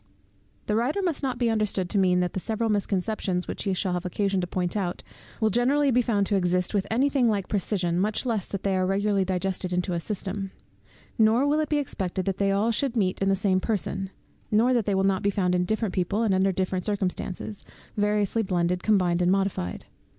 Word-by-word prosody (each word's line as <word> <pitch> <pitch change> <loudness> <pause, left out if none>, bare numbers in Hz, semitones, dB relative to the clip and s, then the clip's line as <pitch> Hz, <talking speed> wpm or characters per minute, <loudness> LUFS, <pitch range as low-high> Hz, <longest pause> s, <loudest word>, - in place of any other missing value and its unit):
The 210 - 0
writer 250 - 0
must 345 -5 0
not 260 -3 -2
be 240 -2 +1
understood 210 -4 0
to 200 - +2
mean 180 -1 +3
that 180 - -1
the - - -2
several 220 +3 -1
misconceptions, 195 -2 -1
which - - -5
he 195 - +1
shall 185 0 -1
have 180 0 -2
occasion 195 +1 0
to 180 - -3
point 180 +1 -2
out, 185 -4 -2 0.4
will 220 -2 +2
be - - -6
generally 255 +1 +3
found 210 -4 +1
to 205 - 0
exist 180 0 +1
with 200 -2 0
any 250 +5 +2
thing 270 -4 +2
like 205 -4 0
precision, 180 -4 0
much 210 +6 0
less 225 -6 -1
that 200 - -5
they 195 -1 +1
are 185 0 +1
regularly 200 0 +1
digested 185 0 -2
into 180 +1 -1
a 170 - 0
system; 195 +1 -4 0.7
nor 225 +5 +4
will 295 +2 +2
it 310 - -1
be 300 - +2
expected 190 -9 -2
they 195 0 0
all 205 +4 +2
should 250 +1 0
meet 185 -3 0
in 195 - +2
the 195 - +3
same 190 -1 +1
person, 195 -2 -2 0.4
nor 230 +4 +3
that 235 -4 +1
they 200 - +1
will 190 - +2
not 195 -1 +2
be 200 - +2
found 185 -3 0
in 180 0 +1
different 215 0 -1
people, 195 +5 0
and 210 -4 +2
under 190 +1 +3
different 185 0 -2
circumstances, 200 0 -3 0.3
variously 210 +1 +1
blended, 180 -2 0
combined, 180 -5 +2
and 180 +1 +3
modified. 190 - -1
195 Hz, 215 wpm, -26 LUFS, 185-220 Hz, 0.7 s, nor